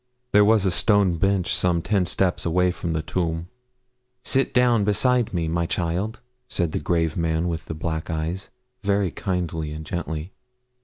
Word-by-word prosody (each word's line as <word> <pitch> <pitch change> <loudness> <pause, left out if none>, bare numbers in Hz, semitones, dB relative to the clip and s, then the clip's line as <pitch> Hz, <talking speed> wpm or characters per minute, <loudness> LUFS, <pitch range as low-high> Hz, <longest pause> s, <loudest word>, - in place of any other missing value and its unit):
There 105 0 +6
was 105 -1 +4
a 95 - +3
stone 100 -3 +3
bench 100 -2 +1
some 85 -2 +1
ten 95 -2 +1
steps 90 0 +1
away 90 +2 +2
from 85 -2 -3
the 80 0 -1
tomb. 85 0 -2 0.7
'Sit 135 0 +1
down 120 -4 +4
beside 115 +3 +2
me, 85 -4 -1
my 85 +1 0
child,' 90 +7 -2 0.3
said 85 -8 -1
the - - -1
grave 80 -2 0
man 80 0 0
with 85 -2 -3
the 80 - -5
black 80 0 -3
eyes, 80 +4 -3 0.3
very 100 -3 +1
kindly 85 -5 -2
and 80 +1 -6
gently. 80 +1 -4
90 Hz, 165 wpm, -24 LUFS, 80-100 Hz, 0.7 s, There